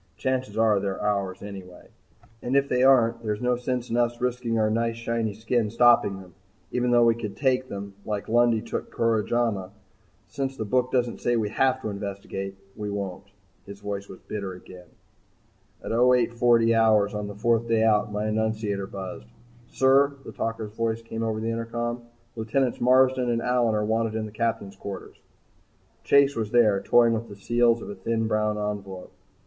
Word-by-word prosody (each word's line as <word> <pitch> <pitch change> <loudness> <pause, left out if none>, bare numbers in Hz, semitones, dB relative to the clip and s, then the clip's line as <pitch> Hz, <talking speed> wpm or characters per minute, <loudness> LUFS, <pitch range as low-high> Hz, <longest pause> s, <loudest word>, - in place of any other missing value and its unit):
Chances 130 -5 -2
are 110 -2 +3
they're 95 -1 -3
ours 100 -2 -2
anyway 95 -3 -10 0.5
and 125 +2 -2
if 140 0 +3
they 125 -2 +1
aren't 120 -3 +4
there's 105 -2 -2
no 125 0 +1
sense 125 0 -3
in 115 - 0
us 120 0 +1
risking 125 -2 -1
our 110 -1 +2
nice 115 +1 0
shiny 115 -2 -2
skin 110 0 0
stopping 115 -4 +4
them 90 -2 -14 0.4
even 125 0 0
though 120 -1 +5
we 115 - +5
could 110 -3 -6
take 130 -1 +1
them 100 0 -6
like 105 -1 -4
Lundy 120 -1 +3
took - - -5
Koromaja. 115 -3 0 0.6
Since 135 -1 -4
the 110 - -3
book 125 +4 +1
doesn't 120 -2 0
say 120 - +1
we 110 -3 0
have 130 +2 +1
to 110 - -2
investigate, 100 -1 -6 0.2
we 105 -1 -5
won't." 100 -1 -5 0.4
His 100 0 -9
voice 100 -1 -5
was 95 - -10
bitter 100 -3 -5
again. 90 0 -13 1.0
At - - -5
0840 120 -1 +3
hours 110 -2 +3
on 105 -1 -3
the 100 - -8
fourth 115 +2 +1
day 115 -1 +2
out, 105 -1 +2
my 105 +1 -2
annunciator 110 -2 -1
buzzed. 95 -10 -7 0.4
"Sir," 135 +3 +3
the - - -7
talker's 115 -2 -4
voice 115 0 -2
came 115 0 -6
over 110 -1 -1
the 115 +1 -2
intercom, 120 +1 -3 0.3
"Lieutenants 120 +3 -1
Marsden 130 0 +4
and 115 -1 0
Allyn 120 -3 +2
are 105 0 0
wanted 110 0 0
in 110 -1 -2
the 105 - -8
Captain's 110 -3 -2
quarters." 100 -1 -8 0.9
Chase 140 0 +4
was 110 -2 -2
there 110 -4 +3
toying 120 -1 +4
with 115 +1 -3
the 100 - -9
seals 120 +3 +2
of - - -8
a - - -5
thin, 115 +4 -2
brown 105 -1 0
envelope. 100 -3 -5
115 Hz, 180 wpm, -25 LUFS, 105-120 Hz, 1.0 s, though